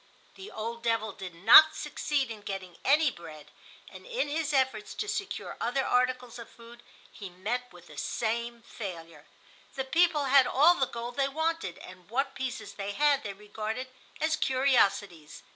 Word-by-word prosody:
The 390 +2 -11
old 230 +2 -6
devil 225 -2 0
did 185 -2 -9
not 230 - +8
succeed 295 -4 -2
in 215 -2 -8
getting 190 -3 -6
any 295 +1 +4
bread, 160 -6 -12 0.4
and - - -12
in - - -2
his 305 0 -1
efforts 260 -6 0
to 420 - -3
secure 400 -1 -4
other 260 +3 0
articles 250 -1 0
of 235 - -10
food 235 +1 -15 0.3
he 200 -3 -9
met 225 +8 -4
with 175 -1 -15
the - - -14
same 235 +1 -3
failure. 165 -9 -9 0.5
The 265 -1 -3
people 325 0 +2
had 270 -1 +5
all 305 +6 +5
the 270 -7 0
gold 240 +1 -7
they 275 0 +1
wanted 320 - -2
and 185 0 -13
what 270 +4 -1
pieces 260 -1 -5
they 200 0 -5
had 290 +2 +3
they 200 -5 -6
regarded 215 +5 -6 0.3
as 315 0 +1
curiosities. 205 - +1
240 Hz, 165 wpm, -29 LUFS, 205-280 Hz, 0.5 s, not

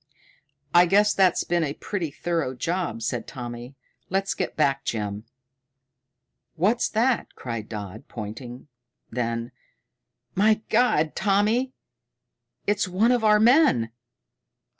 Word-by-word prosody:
"I 175 +1 +7
guess 205 +3 +4
that's 190 -3 +3
been 175 -1 0
a 145 -1 -3
pretty 185 -6 -3
thorough 150 -3 -2
job," 170 -4 -2
said - - -2
Tommy. 120 0 -7 0.3
"Let's 195 +1 0
get - - -3
back, 135 -3 +2
Jim." 105 -3 -3 1.3
"What's 205 +8 +1
that?" 235 +3 0
cried 115 -4 -6
Dodd, 105 -1 -7
pointing. 120 +4 -8 0.4
Then, 115 0 -2 0.8
"My 215 +2 +3
God, 215 -10 +2
Tommy, 215 +6 +1 0.9
it's 205 -1 +1
one 200 +7 +2
of 245 -2 +2
our 210 -1 +5
men!" 220 - +4
170 Hz, 115 wpm, -25 LUFS, -, 1.3 s, I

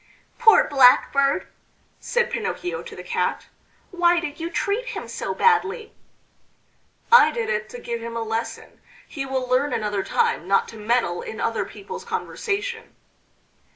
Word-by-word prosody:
"Poor 450 -2 +6
Blackbird!" 275 +1 +4 0.5
said 480 -1 0
Pinocchio 360 +7 -3
to - - -10
the - - -9
Cat. - - -2 0.5
"Why 350 -1 +3
did 300 -3 -6
you 330 +1 -3
treat 415 +7 -1
him 455 -4 -5
so - - -4
badly?" 440 -1 +1 1.2
"I 475 - +8
did 470 -1 -3
it 470 0 -2
to 485 - -8
give 235 - -5
him 230 0 -5
a 230 - -2
lesson. 225 +1 -5 0.3
He 275 -3 -5
will 260 -1 -2
learn 255 +3 +1
another 210 -2 -1
time 170 - 0
not 195 0 +2
to 225 - -11
meddle 215 -5 0
in 220 - -7
other 230 -1 -1
people's 200 -2 -9
conversation." 455 +2 -4
290 Hz, 150 wpm, -23 LUFS, -, 1.2 s, I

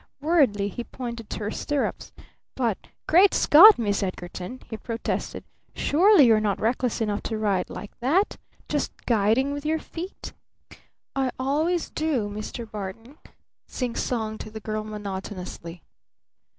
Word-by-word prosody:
Worriedly 275 -10 +2
he 220 +4 -5
pointed 235 -3 -7
to - - -4
her 210 0 -2
stirrups. 290 +3 -2 0.4
"But 235 -6 -1 0.2
Great 370 +5 +6
Scott, 395 +8 +9
Miss 205 -3 0
Edgarton!" 185 +4 -5
he 220 - -5
protested. 230 +2 -4 0.3
"Surely 355 0 +5
you're 225 -2 +5
not 210 -2 0
reckless 245 +1 0
enough 210 -2 -1
to 220 - -3
ride 200 -4 0
like 205 - -8
that? 325 - +1 0.3
Just - - -1
guiding 230 +5 +2
with 285 0 -5
your 310 +1 +1
feet?" 340 +4 -8 0.8
"I 265 -1 +1
always 310 +6 0
do, 280 -10 -1
Mr. 215 +3 -6
Barton," 215 - -8 0.5
singsonged 230 -3 -3
the 220 - -7
girl 215 0 -3
monotonously. 190 -5 -7
230 Hz, 130 wpm, -25 LUFS, 205-285 Hz, 0.8 s, Scott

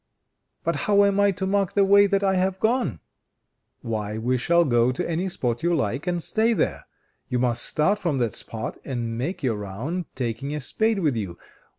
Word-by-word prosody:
"But - - 0
how 205 -1 +5
am 200 0 +2
I 200 0 +5
to 190 0 -3
mark 195 -1 +1
the 200 -1 +4
way 200 +1 +6
that 200 0 +1
I 195 -1 +3
have 190 0 0
gone?" 220 - 0 0.8
"Why, 110 -2 -3
we 120 +3 0
shall 170 +7 +3
go 120 -3 +3
to 130 - -3
any 170 +3 -1
spot 120 -8 -2
you 175 0 +2
like, 135 - -2
and 175 -2 -1
stay 225 +1 +2
there. - - -1 0.4
You 125 - -1
must 120 -1 +1
start 195 +7 +1
from 170 -8 -1
that 120 -5 0
spot 115 +2 -5
and 120 -4 -3
make 140 +9 -3
your 115 -5 0
round, 120 - -4
taking 135 +3 -3
a - - -2
spade 220 - +1
with 155 -9 +1
you. 95 -6 -4
150 Hz, 200 wpm, -24 LUFS, 120-195 Hz, 0.8 s, way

